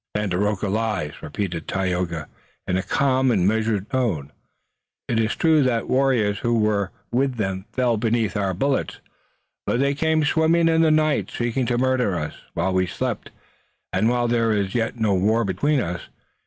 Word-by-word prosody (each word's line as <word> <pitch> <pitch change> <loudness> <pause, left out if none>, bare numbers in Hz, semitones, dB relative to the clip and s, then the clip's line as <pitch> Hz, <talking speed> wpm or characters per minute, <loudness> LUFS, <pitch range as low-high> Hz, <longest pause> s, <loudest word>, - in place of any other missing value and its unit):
"Tandakora 105 0 0
lies," 105 -8 -2
repeated 90 -6 -4
Tayoga 90 -4 -2 0.4
in 95 0 +1
calm 130 +7 +1
and 95 -6 +2
measured 110 -1 0
tones. 100 - -1 0.8
"It 115 - 0
is 110 0 0
true 160 -2 +3
that 125 -4 +1
warriors 125 -6 +2
who 120 0 +1
were 105 -3 +1 0.2
with 130 +2 +1
them 95 -3 -3
fell 125 -3 +1
beneath 115 -1 0
our 100 -3 0
bullets, 135 +8 -1 0.7
but 120 - +1
they 140 +1 +2
came 160 +1 +1
swimming 165 +2 +3
in 165 0 +3
the 160 - +4
night, 155 -1 +2
seeking 120 +1 -1
to 120 0 +1
murder 125 -7 +1
us 75 -1 -4 0.2
while 90 +3 0
we 95 0 +2
slept, - - -3 0.6
and 110 - +2
while 120 0 +1
there 115 -1 +2
is 100 -2 -1
yet 115 0 -1
no 110 -3 +2
war 105 +5 +2
between 130 - +1
us. 90 -5 -3
110 Hz, 165 wpm, -23 LUFS, 95-130 Hz, 0.8 s, the